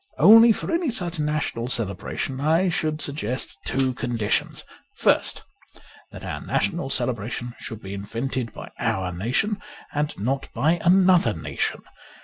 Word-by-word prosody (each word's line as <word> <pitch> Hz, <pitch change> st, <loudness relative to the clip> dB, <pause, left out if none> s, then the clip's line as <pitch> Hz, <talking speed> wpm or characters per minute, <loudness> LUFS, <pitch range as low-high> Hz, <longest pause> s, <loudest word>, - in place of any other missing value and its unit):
Only 225 Hz, +2 st, +9 dB
for 220 Hz, -, -2 dB
any 335 Hz, -2 st, +1 dB
such 180 Hz, -8 st, -1 dB
national 150 Hz, -6 st, -1 dB
celebration 120 Hz, +4 st, -2 dB
I 165 Hz, +5 st, +3 dB
should 155 Hz, -2 st, -1 dB
suggest 135 Hz, -4 st, -3 dB
two 135 Hz, -1 st, +1 dB
conditions: 120 Hz, -4 st, -1 dB, 0.3 s
first, -, -, +1 dB, 0.7 s
that -, -, -10 dB
our -, -, -4 dB
national 135 Hz, -, -1 dB
celebration 120 Hz, -1 st, -2 dB
should 110 Hz, -1 st, -6 dB
be 95 Hz, -, -6 dB
invented 115 Hz, +4 st, -3 dB
by -, -, -10 dB
our 95 Hz, -1 st, -1 dB
nation 130 Hz, -, 0 dB, 0.3 s
and 150 Hz, 0 st, 0 dB
not 135 Hz, +7 st, -2 dB
by 165 Hz, +4 st, +2 dB
another 180 Hz, -, +5 dB
nation. 80 Hz, -, -3 dB
135 Hz, 130 wpm, -24 LUFS, 115-170 Hz, 0.7 s, Only